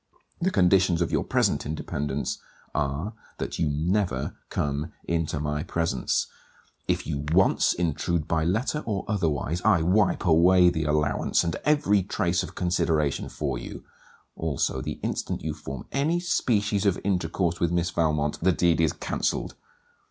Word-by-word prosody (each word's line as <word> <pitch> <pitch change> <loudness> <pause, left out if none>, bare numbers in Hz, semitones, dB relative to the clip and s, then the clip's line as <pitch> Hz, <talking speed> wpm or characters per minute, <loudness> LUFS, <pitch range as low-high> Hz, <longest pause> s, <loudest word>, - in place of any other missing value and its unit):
The 180 +1 +1
conditions 90 - +3
of 85 - -3
your - - +1
present - - +1
independence 75 -2 -3 0.3
are, 75 +8 -2 0.2
that - - -4
you 80 - +2
never 80 -1 0
come 70 +3 -2
into 80 -2 -1
my 75 0 -2
presence: 80 -6 0 0.6
If - - 0
you 70 +1 -3
once 95 +3 +4
intrude 85 -1 -1
by 80 -1 +1
letter 115 - 0
or 100 -4 -2
otherwise 85 -5 -1
I 80 - +3
wipe 95 +4 +2
away 90 +2 +6
the 80 -2 -2
allowance 75 +1 +1
and 85 -2 -1
every 145 -10 +3
trace 85 -2 0
of - - -7
consideration 80 -5 0
for 70 -5 -3
you: - - -8 0.5
Also, 80 -4 -1
the - - -5
instant - - -3
you 80 0 -2
form 65 -2 -7
any 155 +5 +1
species 105 - +1
of 95 - +2
intercourse 90 -2 0
with 85 -1 +1
Miss 85 0 0
Valmont, 75 -3 0
the 95 +3 +4
deed 85 -2 +2
is 80 -3 +2
cancelled. - - -2
85 Hz, 150 wpm, -26 LUFS, 75-95 Hz, 0.6 s, away